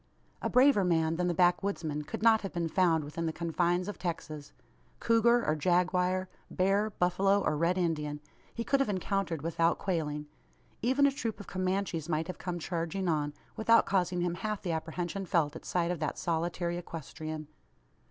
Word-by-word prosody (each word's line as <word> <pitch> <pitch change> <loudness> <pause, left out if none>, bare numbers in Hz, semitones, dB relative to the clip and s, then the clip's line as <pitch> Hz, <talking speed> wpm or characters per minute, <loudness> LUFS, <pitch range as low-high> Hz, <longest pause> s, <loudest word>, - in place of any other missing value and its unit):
A - - -1
braver 255 -4 +5
man 165 -2 +1
than 180 0 0
the 175 - +1
backwoodsman 175 -4 +1
could 210 - -5
not 225 -1 +6
have 195 - -5
been 170 -1 -1
found 165 -2 +3
within 165 +3 -4
the - - 0
confines 175 +2 0
of 205 - -6
Texas. 155 -4 -5 0.5
Cougar, 235 +1 +3
or 155 - +2
jaguar 180 +3 +1 0.2
bear, 195 +3 +1
buffalo, 195 +1 +2
or 155 - +1
Red 170 +4 +1
Indian 150 -4 -1 0.3
he 230 - -4
could 275 +3 +2
have 275 - +1
encountered 185 -5 -1
without 165 +1 +1
quailing. 150 -5 -2 0.6
Even 260 +4 +3
a 280 - +4
troop 230 -5 -4
of 205 - -8
Comanches 185 -3 -2
might 160 0 0
have 185 - -7
come 180 -1 -3
charging 170 +2 -3
on, 150 -3 0 0.2
without 230 +1 +4
causing 180 -2 +1
him 175 -1 0
half 210 +4 -3
the 175 - -1
apprehension 170 +4 -3
felt 160 -3 +1
at - - -9
sight 175 -1 0
of 175 - -3
that 150 -1 -2
solitary 170 +1 -1
equestrian. 155 -2 -7
175 Hz, 175 wpm, -30 LUFS, 160-195 Hz, 0.6 s, not